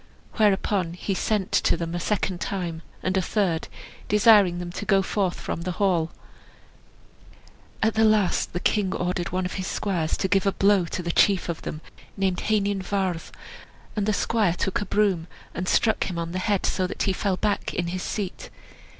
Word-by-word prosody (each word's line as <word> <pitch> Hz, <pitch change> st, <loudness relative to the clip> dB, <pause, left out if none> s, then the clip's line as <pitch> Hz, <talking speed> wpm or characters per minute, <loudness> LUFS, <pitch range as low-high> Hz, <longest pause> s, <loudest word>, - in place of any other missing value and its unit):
Whereupon 195 Hz, -4 st, +2 dB
he 185 Hz, +3 st, -3 dB
sent 195 Hz, +1 st, -1 dB
to -, -, +2 dB
them 170 Hz, 0 st, -4 dB
a 175 Hz, -, -2 dB
second 190 Hz, -1 st, -1 dB
time, 175 Hz, -4 st, -3 dB, 0.2 s
and 185 Hz, +1 st, 0 dB
a 190 Hz, -, +3 dB
third, 180 Hz, -5 st, 0 dB, 0.4 s
desiring 205 Hz, -4 st, +5 dB
them 175 Hz, 0 st, -5 dB
to 175 Hz, -, -5 dB
go 195 Hz, -2 st, +3 dB
forth 190 Hz, -2 st, -1 dB
from -, -, -4 dB
the 180 Hz, +1 st, -3 dB
hall. 175 Hz, -5 st, +1 dB, 1.7 s
At 220 Hz, 0 st, +3 dB
the 220 Hz, -, +3 dB
last 215 Hz, -4 st, +3 dB
the 175 Hz, -, -1 dB
king 195 Hz, 0 st, +1 dB
ordered 180 Hz, 0 st, -2 dB
one 185 Hz, +1 st, -1 dB
of 180 Hz, -, -4 dB
his 185 Hz, -, -4 dB
squires 175 Hz, -6 st, -1 dB
to 190 Hz, -, 0 dB
give 195 Hz, 0 st, +2 dB
a 195 Hz, -, +2 dB
blow 195 Hz, -2 st, +3 dB
to 175 Hz, +2 st, -4 dB
the 170 Hz, -, -1 dB
chief 190 Hz, 0 st, +3 dB
of 170 Hz, -, -3 dB
them, 155 Hz, -, -6 dB, 0.4 s
named 190 Hz, -2 st, 0 dB
Heinin 205 Hz, -2 st, +1 dB
Vardd; 185 Hz, -3 st, -2 dB, 0.7 s
and 210 Hz, -1 st, -1 dB
the -, -, +3 dB
squire 210 Hz, -5 st, +1 dB
took 190 Hz, +2 st, -1 dB
a 205 Hz, -, -4 dB
broom 195 Hz, -6 st, +1 dB, 0.3 s
and 180 Hz, +1 st, -4 dB
struck 220 Hz, +3 st, +2 dB
him 180 Hz, -, -4 dB
on 170 Hz, 0 st, -3 dB
the 185 Hz, -, -2 dB
head, 200 Hz, 0 st, 0 dB
so 185 Hz, -1 st, 0 dB
that -, -, -3 dB
he 195 Hz, -, +1 dB
fell 190 Hz, 0 st, -1 dB
back 205 Hz, 0 st, -1 dB
in 170 Hz, -1 st, -2 dB
his 185 Hz, +1 st, -3 dB
seat. 195 Hz, -2 st, -4 dB
190 Hz, 195 wpm, -25 LUFS, 175-205 Hz, 1.7 s, desiring